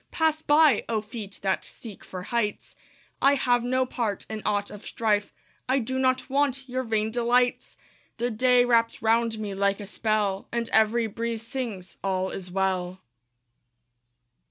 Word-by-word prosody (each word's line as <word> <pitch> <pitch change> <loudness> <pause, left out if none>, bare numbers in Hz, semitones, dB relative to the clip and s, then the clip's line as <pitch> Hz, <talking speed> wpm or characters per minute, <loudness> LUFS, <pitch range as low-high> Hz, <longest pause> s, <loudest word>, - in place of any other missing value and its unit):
Pass 315 -1 +1
by, 300 -1 +5
oh, 225 -2 +1
feet 210 -2 -8
that 190 -1 0
seek 220 -5 -11
for 185 -1 -7
heights! 215 0 -2 0.5
I 280 +1 +5
have 245 -3 +2
no 255 +1 +1
part 225 -5 -3
in 215 0 -4
aught 205 -1 0
of 210 0 -10
strife; 210 -2 0 0.4
I 260 - +3
do 260 +1 -2
not 255 -1 +1
want 275 -1 0
your 255 +1 -2
vain 220 -3 -1
delights. 245 +1 +1 0.4
The 240 +1 -1
day 250 +2 +4
wraps 230 -2 +2
round 225 0 +2
me 210 -2 -4
like 200 +1 +1
a 205 - -6
spell, 210 -2 -1
And 235 -1 -2
every 220 +2 +4
breeze 230 +1 -3
sings, 230 -7 -5
"All 190 -1 -1
is 185 -1 -6
well." 185 -1 -1
230 Hz, 155 wpm, -26 LUFS, 205-250 Hz, 0.5 s, by